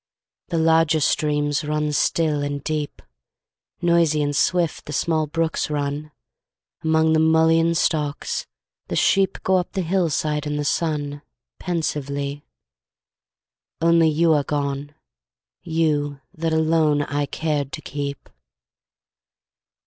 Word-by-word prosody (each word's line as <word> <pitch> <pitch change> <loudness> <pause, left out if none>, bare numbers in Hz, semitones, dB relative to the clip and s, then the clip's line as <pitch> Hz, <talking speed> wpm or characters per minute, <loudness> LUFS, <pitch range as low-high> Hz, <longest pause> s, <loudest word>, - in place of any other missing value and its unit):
The 170 - -2
larger 160 -1 +3
streams 145 0 +1
run 150 0 -1
still 150 0 +1
and 145 0 -3
deep, 150 -2 -3 0.8
Noisy 165 -3 +3
and 145 0 -1
swift 170 +2 +1
the 150 - -5
small 155 +1 0
brooks 165 +1 -1
run 145 +1 -3 0.7
Among 160 0 +3
the 160 - +3
mullein 160 +1 +4
stalks 150 -3 -1 0.4
the - - -3
sheep 195 -1 +2
Go 190 0 +3
up 180 - -3
the 190 -2 -1
hillside 155 -4 0
in 150 - -2
the 145 0 -2
sun, 145 -2 -1 0.4
Pensively, 145 -4 -3 1.4
only 165 -1 +4
you 160 +1 +3
are 145 -2 +2
gone, 145 0 -3 0.7
You 150 -4 0
that 165 0 -2
alone 160 -2 +2
I 145 0 -2
cared 145 -3 -2
to 155 - -5
keep. 140 0 -5
155 Hz, 120 wpm, -22 LUFS, 145-165 Hz, 1.4 s, mullein